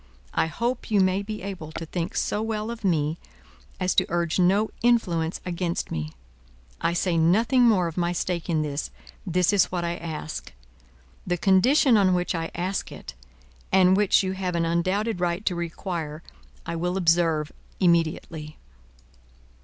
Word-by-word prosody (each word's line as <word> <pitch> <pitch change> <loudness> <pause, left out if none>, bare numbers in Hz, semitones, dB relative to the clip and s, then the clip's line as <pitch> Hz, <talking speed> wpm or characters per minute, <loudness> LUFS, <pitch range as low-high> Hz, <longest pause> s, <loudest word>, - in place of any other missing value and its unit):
I - - +2
hope 235 +11 -3
you 210 -2 +3
may 185 +1 +2
be 210 -1 -6
able 185 -6 -6
to 165 - -5
think 165 +1 -4
so 210 - 0
well 220 0 -2
of 235 -1 -8
me, 160 -4 +1 0.6
as 185 -1 +1
to - - +2
urge 170 0 0
no 195 +4 +3
influence 180 -9 +1
against 175 -1 -2
me. 75 0 -4 0.7
I 170 - +2
say 175 0 0
nothing 225 +10 +4
more 195 -6 +4
of 165 0 -5
my 175 -1 +1
stake 175 0 -2
in 155 -2 +1
this; 145 -1 -3 0.4
this 180 +3 +2
is 200 -3 +5
what 175 -1 -2
I 170 0 -2
ask. 155 - -6 0.7
The 180 - 0
condition 225 - +4
on 190 -3 +4
which 180 0 -1
I 165 -1 -3
ask 185 +3 -2
it, - - -9 0.6
and 185 -1 +5
which 200 -1 +4
you 185 - -1
have 185 -2 -3
an 165 0 +1
undoubted 185 +5 0
right 175 +3 -1
to 185 - +1
require, 170 -2 -4 0.4
I 170 - -3
will 180 +2 -1
observe 165 -3 +2 0.3
immediately." 165 -3 0
180 Hz, 160 wpm, -25 LUFS, 165-195 Hz, 0.7 s, is